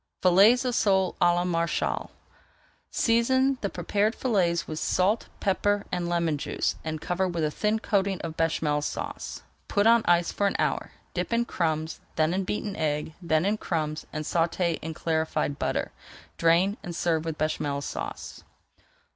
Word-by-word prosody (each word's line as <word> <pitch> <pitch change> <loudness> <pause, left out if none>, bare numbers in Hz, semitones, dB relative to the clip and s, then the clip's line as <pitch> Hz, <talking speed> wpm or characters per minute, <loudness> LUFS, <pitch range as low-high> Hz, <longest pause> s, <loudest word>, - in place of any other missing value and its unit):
FILLETS 200 +8 +6
OF 250 - 0
SOLE 190 -5 +2
À 175 0 +5
LA 175 - +1
MARÉCHALE 170 -1 -1 0.8
Season 260 +3 +2
the 200 - -1
prepared 205 +6 0
fillets 180 -9 +1
with 155 0 -4
salt, 195 +7 +1
pepper, 205 +1 +1
and 175 -1 -1
lemon 170 -4 0
juice, - - -1
and 155 -1 -3
cover 180 +3 -1
with 170 -3 -2
a 150 - +1
thin 210 +6 0
coating 200 -3 0
of 160 -1 -5
Béchamel 155 -2 0
Sauce. - - -5 0.2
Put 205 0 +1
on 230 0 +6
ice 175 0 +3
for 200 - +1
an - - -1
hour, - - -1 0.2
dip - - -2
in 235 0 +2
crumbs, 160 -5 -2 0.2
then 155 +2 +2
in 190 0 -1
beaten 210 0 -3
egg, 150 0 -1
then 160 -1 +1
in 210 +2 +1
crumbs, 155 -5 -3
and 155 -1 -4
sauté 170 +1 0
in 160 0 -5
clarified 160 -3 -1
butter, - - -1 0.4
drain, 175 +5 +3
and 175 -1 -6
serve 165 -2 +1
with 160 -2 -4
Béchamel 145 -2 -1
Sauce. - - -6
175 Hz, 165 wpm, -27 LUFS, 160-200 Hz, 0.8 s, FILLETS